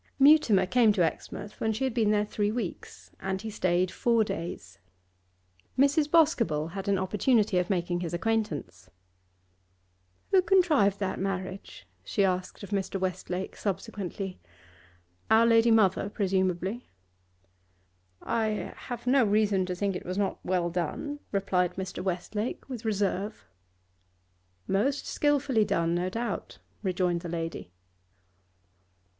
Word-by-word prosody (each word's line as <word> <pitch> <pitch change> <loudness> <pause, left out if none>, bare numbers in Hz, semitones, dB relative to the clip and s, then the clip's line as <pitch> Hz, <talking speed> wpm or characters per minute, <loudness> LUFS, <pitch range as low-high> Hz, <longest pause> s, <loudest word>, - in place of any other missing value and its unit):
Mutimer 275 -9 +6
came 230 +2 +4
to 185 -4 +2
Exmouth 205 +5 -6
when 220 - +1
she 220 +4 -2
had 260 -3 0
been 225 -3 +2
there 210 0 +2
three 205 0 -1
weeks, 220 -6 -6
and 190 0 -2
he 220 - -4
stayed 185 -2 +1
four 230 -2 +2
days. 130 - -6 1.0
Mrs. 285 +3 +3
Boscobel 230 - +3
had 195 +3 -6
an 200 -1 +2
opportunity 205 +1 +2
of 180 - -2
making 175 -2 0
his 175 -2 -4
acquaintance. 170 - -2 1.4
'Who 380 - +6
contrived 320 - +3
that 195 -2 -2
marriage?' 190 0 -5 0.2
she 200 - +1
asked 185 +1 -2
of 200 - -9
Mr. 195 -1 -1
Westlake 185 0 -3
subsequently. 195 -2 -4 0.9
'Our 225 +1 +6
lady 230 0 +5
mother, 205 -3 +3
presumably.' 190 +2 -1 1.4
'I 220 -2 -1
have 240 -1 -7
no 260 +1 +4
reason 205 -3 +2
to 180 - -2
think 195 +1 -1
it - - -5
was 185 +2 -4
not 200 -1 -1
well 175 -2 0
done,' 275 - -3
replied 185 -3 0
Mr. 190 -1 -5
Westlake 195 +5 -3
with 250 -4 -7
reserve. 205 0 -1 1.2
'Most 260 +9 0
skilfully 285 -6 +2
done, 170 -4 0
no 175 +1 0
doubt,' 225 +1 -4 0.2
rejoined 180 -3 0
the 175 - -6
lady. 165 - -4
200 Hz, 130 wpm, -28 LUFS, 180-225 Hz, 1.4 s, Mutimer